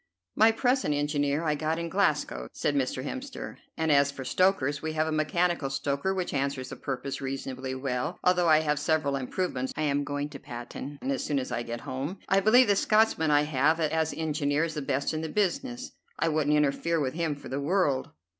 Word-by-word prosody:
"My 220 +1 +6
present 245 - +1
engineer 145 +1 0
I 155 -2 +1
got 155 +2 -1
in 170 0 -3
Glasgow," 65 - 0
said 145 - 0
Mr. 130 -2 -1
Hemster; 260 - -6 0.2
"and 160 -1 +1
as 140 -1 +5
for 135 -2 -7
stokers 145 -2 +2
we 160 0 -3
have 155 0 +1
a 160 - -2
mechanical 155 0 +1
stoker 140 +6 -1
which 185 -2 -2
answers 135 -2 -1
the - - -6
purpose 135 0 -4
reasonably 130 -1 -4
well, 130 +4 -2
although 180 -2 +3
I 155 0 +6
have 150 -2 0
several 150 -2 +1
improvements 130 -1 -2
I 155 - 0
am 145 -1 +1
going 145 0 -3
to 140 -2 -9
patent 130 +2 -7
as 135 0 -1
soon 145 - -1
as 130 - -2
I 120 - -1
get 120 0 -5
home. 135 +9 -4
I 195 - +4
believe 230 +6 +6
the 200 - +4
Scotchman 215 -6 +3
I 145 0 +4
have 150 +2 +2
as 160 0 +1
engineer 150 -1 0
is 165 -1 -2
the 150 - -3
best 140 +2 -1
in 155 - -2
the 160 - -4
business. 245 - -1 0.3
I - - +1
wouldn't 150 -1 +2
interfere 150 +3 +1
with 130 -3 -1
him 165 -2 -1
for 145 - -11
the 135 +2 -2
world." 145 -4 +1
150 Hz, 205 wpm, -28 LUFS, 140-165 Hz, 0.3 s, My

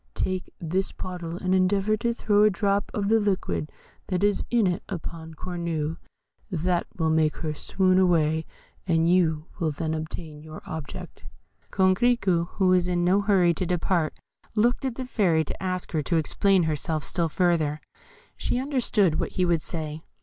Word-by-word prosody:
Take 185 -1 -2
this 185 +4 -1
bottle, 175 -2 -6
and 185 0 -1
endeavour 195 +3 +2
to 235 +1 0
throw 210 -3 +2
a 215 - +6
drop 200 0 0
of 200 -1 -2
the 225 +2 +4
liquid 180 - -1 0.4
that 185 +1 -1
is 205 -1 +2
in 235 -3 +3
it 175 -2 0
upon 160 -1 -6
Cornue. 165 -3 -3 0.5
That 175 -1 0
will 160 -2 +1
make 155 -1 +2
her 155 -2 -3
swoon 185 +4 +2
away, 160 -3 +2 0.4
and 165 -2 +3
you 165 -3 +2
will 165 - +1
then 155 +2 -3
obtain 155 -1 -6
your 155 0 -10
object." 160 -3 -8 0.5
Coquerico, 190 -2 +2
who 190 -2 +2
was 180 -1 +3
in 175 -1 0
no 190 +3 +4
hurry 190 -4 +3
to 170 - -2
depart, 175 -2 0 0.4
looked 240 +5 +2
at 260 -3 -2
the 260 - -4
Fairy 180 -10 +2
to - - -7
ask 185 -1 -2
her 155 - 0
to 170 +4 -1
explain 185 +4 +3
herself 155 0 -1
still 170 -2 +2
further: 160 -3 +1 0.6
she - - -1
understood 235 - +1
what - - -2
he 185 - +1
would 170 -2 +2
say. 155 -2 -5
180 Hz, 170 wpm, -26 LUFS, 160-195 Hz, 0.6 s, a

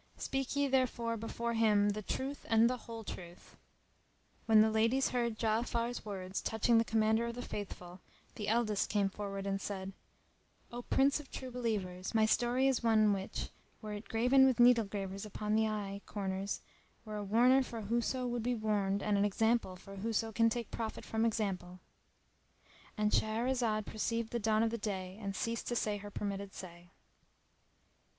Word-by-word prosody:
Speak 270 0 -2
ye 285 0 +2
therefore 250 -3 +1
before 230 +1 -3
him 210 -2 +4
the 210 +1 -2
truth 270 +7 -4
and 225 +1 +5
the 250 - 0
whole 225 -1 -6
truth!" 175 -4 -9 0.9
When 220 -1 +7
the 220 0 +4
ladies 230 +5 +2
heard 235 -3 -1
Ja 220 0 +3
afar's 235 0 -2
words 190 -2 -4
touching 225 +1 +3
the - - +4
Commander 220 +1 +2
of 235 - -4
the 245 - -5
Faithful, 185 -4 -7 0.3
the 210 -2 -5
eldest 220 -2 +1
came 200 -2 +2
forward 195 0 -5
and 195 0 -1
said, 195 -1 -5 0.8
"O 240 +1 -5
Prince 275 +4 +2
of 295 - -11
True 260 -1 -7
Believers, 210 -6 -3
my 220 -1 +5
story 245 +4 +2
is 265 -3 +2
one 215 -3 +4
which, 195 -1 -4 0.3
were 215 -1 -6
it 205 +1 -8
graven 250 +4 +5
with 255 -2 +1
needle 240 -2 +6
gravers 195 -1 -5
upon 210 0 -3
the 220 0 +3
eye 200 -2 -4
corners 195 -1 -3 0.4
were 215 -1 -5
a 205 - -3
warner 245 +6 +5
for 235 -3 -5
whoso 235 +4 -1
would 240 -1 -1
be 245 +2 0
warned 205 -3 0
and 205 -1 +2
an - - +3
example 220 -1 +1
for 195 +2 -11
whoso 225 +2 -1
can 230 +1 +3
take 235 0 -4
profit 225 -1 -4
from 225 +1 0
example."—And 200 +1 -5
Shahrazad 225 -1 +1
perceived 230 +1 -2
the 235 - -1
dawn 220 0 +2
of 225 - +1
day 190 -2 -4
and 200 -1 -4
ceased 230 +3 -2
to 240 - -1
say 210 -3 0
her 205 0 -8
permitted 200 -1 -4
say. 175 -1 -10
220 Hz, 170 wpm, -34 LUFS, 200-235 Hz, 0.9 s, When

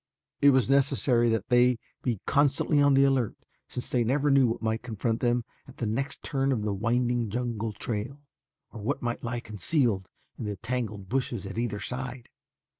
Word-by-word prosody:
It 145 - +7
was 130 -3 +4
necessary 135 -3 +3
that 115 -2 -1
they 125 0 +5 0.2
be 120 -6 -2
constantly 145 +1 +3
on 145 -1 +5
the 135 - +6
alert 135 -5 +2 0.3
since 125 - -5
they 125 -2 +2
never 140 +5 +2
knew 135 -2 +5
what 115 - -2
might 110 +1 0
confront 115 0 -2
them 120 -1 +1 0.2
at - - -14
the 120 - -2
next 135 +6 -2
turn 135 -1 0
of 115 -5 0
the 105 -1 -1
winding 120 +2 0
jungle 115 -1 -2
trail 115 +6 -4 0.5
or 110 - -8
what 105 - -2
might 120 0 -2
lie 120 0 -3
concealed 105 - 0 0.3
in - - -4
the 105 -1 -3
tangled 110 -3 -4
bushes 125 -1 -2
at 100 +3 -4
either 110 -4 -2
side. 125 0 -5
120 Hz, 185 wpm, -28 LUFS, 110-130 Hz, 0.5 s, It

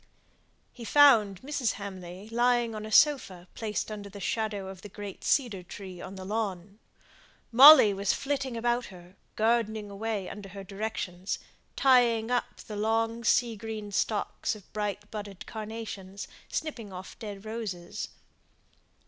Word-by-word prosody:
He 240 - -10
found 230 -8 +5
Mrs. 270 -4 -1
Hamley 190 -1 -8
lying 240 0 +2
on 215 0 -5
a - - -9
sofa 215 - +3
placed 215 -1 -3
under 205 -1 -6
the 200 +1 -10
shadow 210 -2 -2
of 190 -1 -9
the 205 - -9
great 205 -1 -8
cedar 240 -9 +1
tree 185 0 -9
on 195 - -8
the 190 -1 -8
lawn. 200 -1 -3 0.7
Molly 260 -3 +10
was 195 0 +1
flitting 270 -3 -2
about 240 +1 0
her, 180 -1 -14 0.2
gardening 220 -2 +1
away 210 -1 -3
under 200 -1 -8
her 195 +1 -8
directions; 195 -2 -4 0.4
tying 240 -3 +4
up 245 - -1
the 215 - -8
long 225 +2 0
sea 235 0 +3
green 215 -1 -6
stalks 210 +2 -1
of 205 -3 -16
bright 210 -1 -3
budded 205 -3 -7
carnations, 210 -3 -7 0.2
snipping 240 -10 -4
off 185 0 -9
dead 205 -2 -7
roses. 210 -6 -5
215 Hz, 140 wpm, -29 LUFS, 195-230 Hz, 0.7 s, Molly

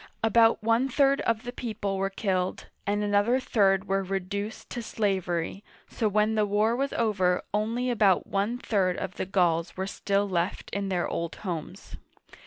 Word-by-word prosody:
About 225 0 +4
one 230 +4 +2
third 275 +1 +3
of 230 0 +1
the 245 - -5
people 215 -5 -3
were 195 0 0
killed, 185 -2 -2 0.2
and 205 +1 +1
another 205 +5 +2
third 195 -5 +2
were 195 0 +1
reduced 195 +3 -4
to 240 - -3
slavery, 190 -4 -2 0.3
so 220 - 0
when 210 +2 +2
the 215 -1 +2
war 210 +3 +2
was 275 +2 -1
over 190 -6 +1
only 230 +4 0
about 205 -5 +3
one 205 +5 -1
third 190 -7 0
of 185 -1 -5
the - - -3
Gauls 175 -3 +1
were 190 - -1
still 200 0 0
left 175 -1 -2
in 200 -1 -2
their 180 -2 0
old 170 -1 -3
homes. 170 -5 -6
205 Hz, 170 wpm, -27 LUFS, 190-225 Hz, 0.3 s, About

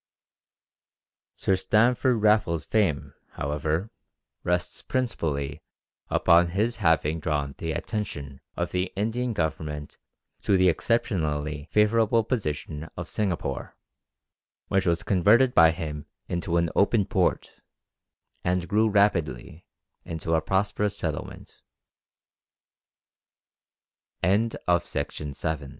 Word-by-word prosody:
Sir 95 - +1
Stamford 115 +3 +2
Raffles' 105 -7 +3
fame, 100 -10 0 0.2
however 80 +7 -2 0.5
rests 90 0 -1
principally 75 - -2 0.5
upon 85 +1 +4
his 110 +7 -1
having 80 -5 +2
drawn 75 -3 -2
the 80 - -2
attention 70 - -5 0.2
of - - -2
the 90 0 -1
Indian 115 +4 -1
Government 75 -4 -3 0.4
to 100 - +3
the 95 0 +5
exceptionally 75 - -1
favourable 110 +1 +3
position 75 - -3
of 90 -1 -5
Singapore, 100 -6 -3 0.9
which 95 -1 +1
was 85 -1 +1
converted 110 +7 +4
by 80 0 +7
him 75 -3 -5 0.2
into 85 -1 -1
an 85 -1 +2
open 100 0 +3
port, 95 -5 -1 0.8
and 90 0 0
grew 110 +2 +3
rapidly 85 - 0 0.4
into 80 0 -3
a 80 - +3
prosperous 100 +4 0
sett - - -1
90 Hz, 95 wpm, -26 LUFS, 80-105 Hz, 0.9 s, by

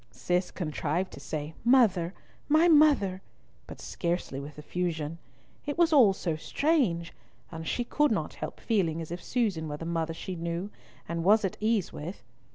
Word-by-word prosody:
Cis 180 +5 -1
contrived 165 +1 -2
to - - -9
say 155 0 -5
"Mother, 210 -8 +4 0.3
my 315 +3 +5
mother," 290 - +5 0.5
but - - -10
scarcely 170 -6 -3
with 145 +2 -9
effusion. 160 0 -3 0.5
It 290 - -2
was 340 -1 +4
all 245 -9 +7
so 170 -4 -2
strange, 190 - 0 0.4
and 160 0 -6
she 245 - 0
could 295 +5 +2
not - - -1
help - - -6
feeling 180 -8 0
as 165 0 -6
if 175 +1 -5
Susan 205 -10 0
were 150 -1 -4
the 165 - -7
mother 165 -1 -2
she 185 +2 -5
knew 170 +4 -3 0.4
and 170 0 -2
was 210 +3 +5
at 195 +2 -2
ease 215 -3 +1
with. 170 +6 -7
180 Hz, 165 wpm, -29 LUFS, 165-225 Hz, 0.5 s, all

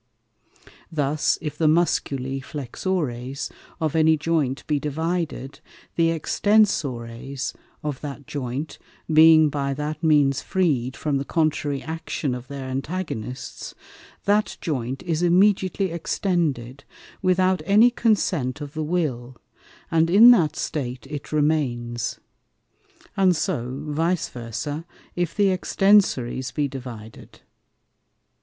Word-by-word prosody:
Thus, 150 -1 +1
if 150 - -5
the 160 - +3
Musculi 135 -5 +1
Flexores 135 -2 -3 0.3
of 160 -1 -1
any 160 0 +4
Joint 150 -4 -1
be 150 -2 0
divided, 155 -1 -3 0.4
the 165 -1 +3
Extensores 140 - 0 0.3
of 145 -4 -4
that 145 -1 -7
Joint 135 +2 -5 0.3
being 155 0 +7
by 140 -1 -2
that 150 +2 -4
means 145 -4 +3
free'd 135 -9 0
from 145 -3 -1
the - - -2
contrary 150 -2 0
Action 160 -4 -3
of 125 0 -7
their 140 -1 -6
Antagonists, 130 -3 -5 0.5
that 205 +1 +1
Joint 135 -1 -3
is 170 -2 -1
immediately 190 +1 +3
extended 155 - -1 0.4
without 185 -1 +2
any 220 +5 +6
consent 185 - 0
of 145 -1 -7
the 155 - -3
Will, 140 -7 -2 0.6
and 165 0 +3
in 220 +7 +9
that 175 -11 +3
State 125 -4 -4
it 145 -2 -6
remains; 130 -6 0 1.0
and 190 -3 +4
so 130 -1 -2
Vice 165 +3 0
versa, 125 +6 -5 0.3
if 175 -2 -2
the 200 -3 +3
Extensores 180 - +2
be 145 -2 0
divided. 120 -5 -10
150 Hz, 110 wpm, -23 LUFS, 135-170 Hz, 1.0 s, in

